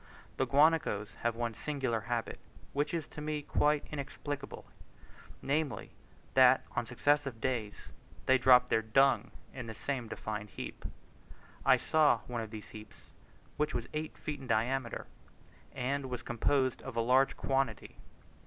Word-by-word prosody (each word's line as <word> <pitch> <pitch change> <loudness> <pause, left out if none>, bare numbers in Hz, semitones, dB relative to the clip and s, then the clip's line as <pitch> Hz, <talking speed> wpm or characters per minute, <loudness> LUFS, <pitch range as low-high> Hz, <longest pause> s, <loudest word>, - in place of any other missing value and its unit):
The - - +1
guanacos 145 -8 +3
have 120 -1 0
one 120 -1 -2
singular 130 -3 -2
habit, 115 +1 -3 0.3
which 145 +1 0
is 165 -3 -2
to 150 - -8
me 150 -1 -2
quite 150 +1 +2
inexplicable; 140 -1 -5 0.8
namely, 145 0 -1 0.4
that 130 0 +6
on 120 -1 -1
successive 135 0 +1
days 115 -4 -3 0.4
they 130 0 +5
drop 125 0 +6
their 110 - +3
dung 135 +5 +3 0.2
in 125 -3 -6
the 110 - -6
same 130 -1 -3
defined 105 -1 -5
heap. - - -8 0.8
I - - +6
saw 150 -7 +3
one 120 -2 -3
of 110 - -6
these 110 -2 -9
heaps 105 -1 -13 0.5
which 150 +1 0
was 120 -1 -2
eight 155 +1 -4
feet 150 -2 -5
in 135 - -9
diameter, 120 +2 0 0.7
and 135 +2 -2
was 125 -1 -4
composed 130 +2 +1
of 130 - -8
a 115 - +2
large 130 +3 +3
quantity. 135 -6 -1
130 Hz, 145 wpm, -32 LUFS, 115-145 Hz, 0.8 s, that